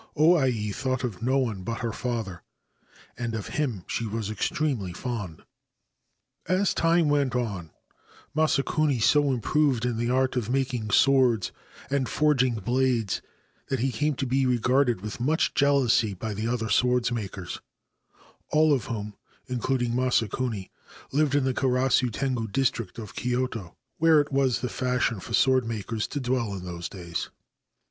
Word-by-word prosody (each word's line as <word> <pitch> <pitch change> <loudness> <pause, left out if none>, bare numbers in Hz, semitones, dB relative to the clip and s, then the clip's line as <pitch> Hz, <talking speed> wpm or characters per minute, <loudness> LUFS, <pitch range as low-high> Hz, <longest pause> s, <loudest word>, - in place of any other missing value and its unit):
O 160 +3 +6
Ai 120 -9 +1
thought 130 +4 -2
of 110 -7 -4
no 130 0 +1
e - - -4
but 105 +4 -5
her 115 -2 -1
father, 115 -6 -4 0.8
and 115 -2 -2
of 110 - -5
him 125 - -2
she 115 - -3
was 110 0 -3
extremely 130 - -1
fond. 105 -6 -5 1.0
As 185 +2 +2
time 165 -1 +3
went 145 -3 +1
on 100 -9 -2 0.7
Masakuni 155 -2 +2
so 145 +5 +4
improved 130 0 +1
in 120 -2 -1
the 120 +1 -1
art 130 +1 +1
of 120 -3 -1
iking 125 -5 -1
swords 125 -6 +4 0.4
and 135 -4 0
forging 130 -5 +2
blades 120 -1 0 0.5
that 135 - -1
he 135 +1 +1
came 150 +6 0
to 135 - -2
be 130 +1 0
yarded 125 -2 +2
with 105 +2 -6
much 150 +7 +1
jealousy 130 -7 +3
by 110 +4 -4
the 110 +3 -3
other 115 -2 -1
swordmakers, 115 -6 0 0.9
of 150 -6 +3
whom, 105 -2 -4 0.3
including 125 -1 -1
Masakuni, 120 -4 0 0.4
lived 145 0 +2
in 145 - +3
the 130 0 +1
Karasu 130 0 +2
sngu 120 -2 -2
district 120 -6 -1
of 110 -3 -8
Kyoto, 125 -6 -2 0.2
where 160 -1 +6
it 145 0 -1
was 135 -3 +2
the 125 - -1
fashion 125 -3 0
for 115 - -8
pordmakers 115 -4 +1
to 145 - -3
dwell 120 -5 -1
in 90 -1 -7
those 85 -1 -5
days. 85 -3 -5
125 Hz, 150 wpm, -26 LUFS, 110-135 Hz, 1.0 s, O